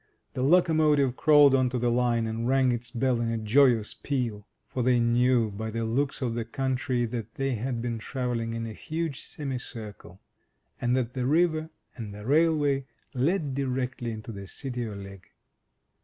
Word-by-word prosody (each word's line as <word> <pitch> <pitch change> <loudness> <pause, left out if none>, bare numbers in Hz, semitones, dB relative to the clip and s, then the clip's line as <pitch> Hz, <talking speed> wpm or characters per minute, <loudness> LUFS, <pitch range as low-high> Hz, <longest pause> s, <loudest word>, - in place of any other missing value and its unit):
The 125 - -3
locomotive 150 -3 +3
crawled 145 -2 +6
on 130 -1 +3
to 125 - -2
the 120 0 +1
line, 120 -1 +1
and 115 +1 -2
rang 130 -1 +3
its 120 0 -3
bell 125 0 0
in 115 - 0
a 115 - -1
joyous 115 0 +3
peal. 120 -7 -3 0.2
For 130 - -3
they 125 0 +3
knew 120 -1 +3
by 110 +3 -5
the 115 +1 -2
looks 135 +5 -1
of 120 -2 -1
the 115 0 -2
country 130 +1 -1
that 115 -1 -5
they 135 -1 -1
had 120 +1 -3
been 120 -2 -2
travelling 120 -2 -3
in 115 0 -3
a 110 - -6
huge 160 +2 -4
semi 135 -4 -5
circle, 105 -7 -9 0.6
and 120 +1 +2
that 125 -1 -1
the 125 -1 -1
river 160 +1 +2 0.3
and 105 -4 -7
the 105 0 -9
railway 145 -2 +2 0.3
led 145 +2 0
directly 130 -2 -2
into 110 0 -6
the 100 -2 -8
City 125 0 -5
o' 105 - -6
Ligg. 100 -1 -9
125 Hz, 180 wpm, -27 LUFS, 115-135 Hz, 0.6 s, crawled